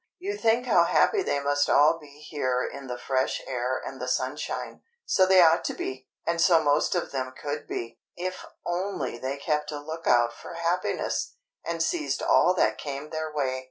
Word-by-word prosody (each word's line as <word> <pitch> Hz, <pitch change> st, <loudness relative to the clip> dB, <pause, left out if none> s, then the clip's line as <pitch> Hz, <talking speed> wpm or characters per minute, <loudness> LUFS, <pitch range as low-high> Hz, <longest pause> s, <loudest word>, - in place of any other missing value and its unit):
You 400 Hz, +3 st, -4 dB
think 235 Hz, -, +2 dB
how -, -, +5 dB
happy 410 Hz, -, +3 dB
they 145 Hz, -, 0 dB
must 145 Hz, 0 st, +1 dB
all 155 Hz, +3 st, +5 dB
be 145 Hz, -1 st, -15 dB
here 130 Hz, -4 st, 0 dB
in 140 Hz, -1 st, -8 dB
the 125 Hz, -1 st, -4 dB
fresh 130 Hz, +1 st, 0 dB
air 130 Hz, 0 st, -2 dB
and 135 Hz, -1 st, -7 dB
the 125 Hz, -, -3 dB
sunshine. 130 Hz, +3 st, -3 dB, 0.2 s
So 185 Hz, -1 st, +4 dB
they 185 Hz, -1 st, +7 dB
ought 165 Hz, 0 st, +5 dB
to -, -, -2 dB
be, 130 Hz, 0 st, -5 dB, 0.2 s
and 170 Hz, 0 st, 0 dB
so 170 Hz, -1 st, +6 dB
most 145 Hz, +4 st, +2 dB
of 175 Hz, -, -2 dB
them 130 Hz, -1 st, -3 dB
could 145 Hz, 0 st, -4 dB
be, 115 Hz, 0 st, -5 dB, 0.2 s
if 185 Hz, +1 st, -4 dB, 0.2 s
only 175 Hz, -8 st, -2 dB
they 135 Hz, +2 st, -3 dB
kept 150 Hz, +1 st, -1 dB
a 150 Hz, -, -4 dB
look 160 Hz, +3 st, -7 dB
out 120 Hz, -1 st, +4 dB
for 170 Hz, -, -10 dB
happiness, 170 Hz, -, -1 dB, 0.3 s
and 165 Hz, -1 st, -1 dB
seized 150 Hz, -5 st, -1 dB
all 180 Hz, +1 st, +4 dB
that -, -, +2 dB
came 145 Hz, +1 st, -6 dB
their 155 Hz, 0 st, -3 dB
way. 135 Hz, -3 st, -1 dB
150 Hz, 195 wpm, -27 LUFS, 130-170 Hz, 0.3 s, they